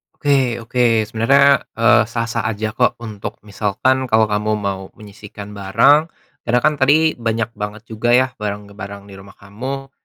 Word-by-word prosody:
Oke 135 -5 +1
oke. 115 -2 +2
Sebenarnya, 135 +5 +3
eee, 115 0 +4
sah-sah 115 -1 -3
aja 110 0 -3
kok 125 +2 +1
untuk 105 -3 -7
misalkan, 110 +6 0
kalau 110 -1 +3
kamu 105 +1 0
mau 100 -2 -3
menyisihkan 105 0 -11
barang 120 +11 +3 0.4
karena 125 +1 +3
kan 155 - +4
tadi 155 +4 +4
banyak 115 0 -2
banget 105 +1 -5
juga 120 +2 +2
ya 130 0 +2
barang-barang 100 -1 -6
di - - -12
rumah 100 0 -15
kamu. 130 +7 -7
115 Hz, 150 wpm, -18 LUFS, 105-130 Hz, 0.4 s, eee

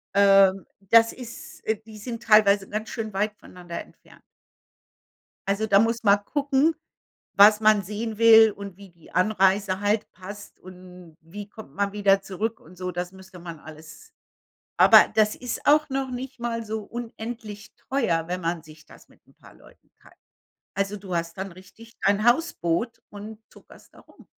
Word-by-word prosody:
ähm, 195 -1 +5
das 225 +4 +4
ist 260 +6 -11
äh, 220 - +2
die 215 -1 -12
sind 230 +2 -7
teilweise 205 -3 +4
ganz 215 +1 -4
schön 220 -3 -5
weit 210 +2 -2
voneinander 175 -3 -9
entfernt. - - -19 1.3
Also 200 +2 0
da 200 -2 +5
muss 230 +2 0
man 200 -1 +4
gucken, 285 +3 +1 0.6
was 210 +2 +7
man 215 -2 +4
sehen 215 +3 -5
will 225 -1 +7
und 200 -2 -10
wie 200 -1 -14
die 170 -2 -20
Anreise 195 0 +1
halt 205 +1 0
passt 205 +2 -11
und 180 -3 -14
wie 200 +6 -10
kommt 210 -10 -13
man 200 +1 -1
wieder 200 -1 +2
zurück 220 +4 -4
und 180 +4 -17
so. 180 0 -4
Das 180 +1 -4
müsste 190 -1 -14
man 170 -2 -9
alles 155 0 -14 0.6
aber - - +7
das 215 -1 +2
ist 250 -1 -6
auch 300 +1 +5
noch 270 -1 -2
nicht 255 +1 -7
mal 230 -1 -3
so 220 0 -4
unendlich 225 -2 -8 0.2
teuer, 175 -12 0
wenn 180 +1 -4
man 165 -1 -3
sich 155 -1 -16
das - - -17
mit - - -26
'n - - -25
paar - - -18
Leuten - - -22
teilt. - - -20 0.6
Also, 195 +1 -2
du 190 -2 -7
hast 170 +1 -3
dann 190 0 -6
richtig 190 +6 -16
dein 200 +2 +2
Hausboot 230 - 0
und 210 +1 -10
tuckerst - - -19
da - - -17
rum. - - -21
205 Hz, 170 wpm, -24 LUFS, 185-225 Hz, 1.3 s, was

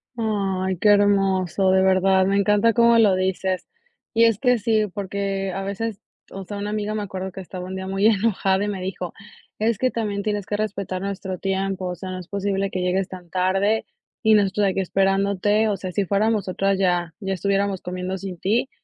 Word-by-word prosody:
Ay, 195 -5 -1
qué 210 - +3
hermoso, 195 -2 +3
de 190 - +4
verdad, 190 0 +4
me 195 +1 +2
encanta 210 +3 +3
como 235 -1 +5
lo 210 -4 +5
dices. 185 0 -1 0.5
Y 230 +1 +4
es 225 -3 +3
que 250 -1 +3
sí, 220 -1 +1
porque 195 -1 -3
a 195 - -4
veces, 200 +1 -4 0.3
o 195 - -7
sea, 205 +2 -7
una 205 +1 -3
amiga 215 0 -2
me 210 - -2
acuerdo 190 -1 -5
que 190 - -8
estaba 180 0 -7
un 190 - -5
día 190 0 -5
muy 195 +2 +2
enojada, 200 -2 +2
y - - -1
me 200 -2 -3
dijo: 185 -1 -5 0.5
"Es 220 0 +1
que 255 +3 +1
también 205 -3 -2
tienes 205 -2 -2
que 205 - -1
respetar 200 -3 -3
nuestro 190 -1 -4
tiempo, 195 0 -2
o 180 - -3
sea, 185 +2 -7
no 185 - -5
es 180 - -10
posible 195 0 -1
que 185 - -2
llegues 180 +1 0
tan 180 -2 -10
tarde 190 +5 +1 0.4
y 220 0 +5
nosotros 205 0 +3
aquí 190 0 0
esperándote, 195 +3 +1
o 205 - -1
sea, 185 -1 -5
si 200 +2 0
fuéramos 210 +4 +2
nosotros 195 +1 0
ya, 175 -3 +1
ya 195 -2 -2
estuviéramos 195 0 0
comiendo 180 +1 -4
sin 185 -2 -7
ti". 225 +9 +1
195 Hz, 205 wpm, -23 LUFS, 190-205 Hz, 0.5 s, como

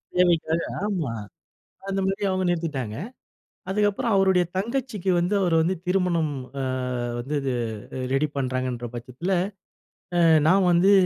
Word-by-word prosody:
தேவைக்காக 170 -2 +3 0.2
ஆமா 175 - -1 0.8
அந்தமாரி 195 +1 -1
அவுங்க 185 0 0
நிறுத்திட்டாங்க. 150 -11 -2 0.7
அதுக்கப்பறம் 210 +4 +1
அவருடைய 190 -2 +4
தங்கச்சிக்கு 225 -3 -2
வந்து 175 +4 +1
அவரு 175 -3 +2
வந்து 175 +4 +1
திருமணம் 180 -5 +1 0.3
அ - - -1 0.6
வந்து 135 +5 -3
இது 135 -2 -1 0.6
ரெடி 145 +3 +2
பண்றாங்கன்ற 130 -2 -2
பட்சத்தில 125 +10 -4 0.9
அ - - +5 0.3
நான் 190 +2 +5
வந்து 175 +3 +5
175 Hz, 115 wpm, -25 LUFS, 145-195 Hz, 0.9 s, அ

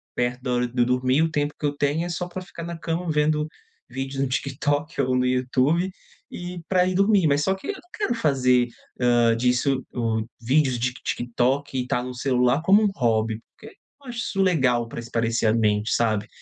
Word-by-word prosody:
perto 125 +1 -1
da 125 -1 -2
hora 125 0 +1
de 125 +1 -6
eu - - +5
dormir, 130 +3 +2
o 165 - 0
tempo 145 0 -1
que 150 - -3
eu 145 - 0
tenho 145 +4 0
é 175 - -4
só 180 +1 -3
pra 180 +1 -6
ficar 170 -2 -9
na 170 0 -5
cama 165 +1 -3
vendo 150 0 +1 0.4
vídeo 135 0 -4
no 135 - +1
TikTok 140 +3 -1
ou 130 -1 +1
no 125 - +2
YouTube 130 +8 +1 0.4
e 175 -1 -7
pra 180 -1 +3
ir 185 - 0
dormir. 195 -2 +4
Mas 145 0 +2
só 190 +3 +1
que 190 - -10
eu 405 - -1
não 355 - -14
quero 410 - 0
fazer, 130 - +2 0.3
hã, 120 -1 +4
disso 125 +2 +1
o 115 -2 0 0.2
vídeos 130 +1 +2
de 125 +2 -1
TikTok 125 +3 -1
e 125 -1 -2
tá 125 - 0
no 125 0 -6
celular 125 +2 +1
como 200 +6 +5
um 210 - +3
hobby, 110 -2 0 0.2
porque 220 - -13
eu - - -33 0.2
não 275 - -15
acho 240 - -5
isso 195 -5 -1
legal 130 -10 +2
pra 115 - -7
espairecer 115 -1 0
a - - +3
mente, 105 -1 +1
sabe. 110 -3 +1
135 Hz, 215 wpm, -24 LUFS, 125-165 Hz, 0.4 s, eu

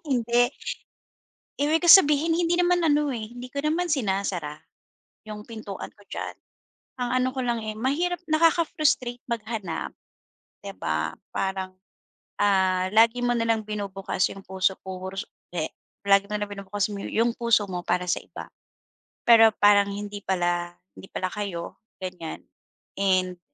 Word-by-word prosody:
Hindi. 245 -2 +2 1.1
Ibig 310 +3 +2
ko 345 - +1
sabihin 325 -2 +7
hindi 345 0 +2
naman 355 0 +2
ano, 295 -2 +2
eh, 225 -2 -5
hindi 245 +1 -7
ko 280 - -3
naman 330 +4 +1
sinasara 190 - -1 0.7
yung 210 -1 -7
pintuan 220 -4 -7
ko 205 - -20
diyan. - - -5 0.6
Ang 245 -1 -2
ano 255 - +2
ko 265 - -4
lang, 235 -2 0
eh, 215 0 -4
mahirap 330 +10 0
nakaka-frustrate 310 -6 +2
maghanap 220 -6 -4 0.7
'di - - -6
ba? 80 +1 -1 0.2
Parang, 190 -1 -3 0.7
ah, 190 -2 +3
lagi 230 +3 +4
mo 245 - +2
na 230 0 0
lang 220 -1 +1
binubukas 200 -3 -2
yung 195 0 -11
puso 190 0 0
ko, 190 0 -6
ru - - -10
so 210 +4 -4 0.3
eh, 155 -2 -2 0.3
lagi 200 0 +5
na 210 0 -2
lang 205 - -2
binubukas 200 0 -2
mo 200 - -5
yung 230 +1 +1
puso 235 -3 +3
mo 180 -1 -3
para 180 +1 0
sa - - +1
iba. - - -10 0.8
Pero 225 -1 +8
parang 205 -1 +6
hindi 205 0 -5
pala 175 -2 -1 0.2
hindi - - -12
pala 185 - -2
kayo 195 -5 -5 0.3
ganyan 180 -3 -6 0.6
and 185 -2 +1
210 Hz, 150 wpm, -25 LUFS, 190-250 Hz, 1.1 s, Pero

